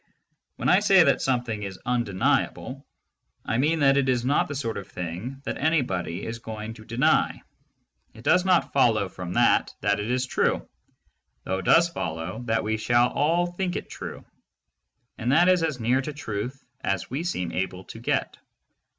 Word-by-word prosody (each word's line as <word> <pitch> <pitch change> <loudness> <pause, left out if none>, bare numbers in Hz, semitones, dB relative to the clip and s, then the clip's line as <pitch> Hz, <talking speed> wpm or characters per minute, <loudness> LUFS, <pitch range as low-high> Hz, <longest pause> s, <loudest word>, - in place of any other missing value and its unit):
When - - -3
I - - +6
say - - +6
that - - +2
something 120 -5 -1
is 95 -2 -5
"undeniable," 125 +3 -1 0.6
I 115 - 0
mean 155 +3 +2
that 135 -1 +5
it 135 -1 +2
is 125 -1 +1
not 140 +3 +2
the 145 - -5
sort 115 -5 -3
of 100 - -7
thing 100 +10 -6
that - - -3
anybody 100 - 0
is 115 0 -5
going 110 -1 -6
to 110 -1 -14
deny; 130 +8 +1 0.7
it 115 - -13
does 180 +7 +4
not 185 -2 +2
follow 110 -7 +3
from 90 -1 -6
that - - +3
that 100 0 +1
it 105 +2 -3
is 125 +1 +1
true, - - 0 0.8
though 95 - -2
it 95 - -7
does 170 +1 +6
follow 90 - -4
that 115 -1 0
we 110 +1 -1
shall 120 +2 +3
all 165 +5 +1
think 175 +1 -3
it - - -5
true - - -8 0.5
— 120 - -52
and 120 +1 0
that 175 +4 +5
is 185 -1 +4
as 155 -5 -1
near 125 +4 +2
to 150 +3 -5
truth 125 -1 -5 0.2
as 100 +1 -2
we 140 +5 -2
seem 90 - -2
able 95 +1 -3
to - - -10
get. - - -1
120 Hz, 185 wpm, -25 LUFS, 105-140 Hz, 0.8 s, I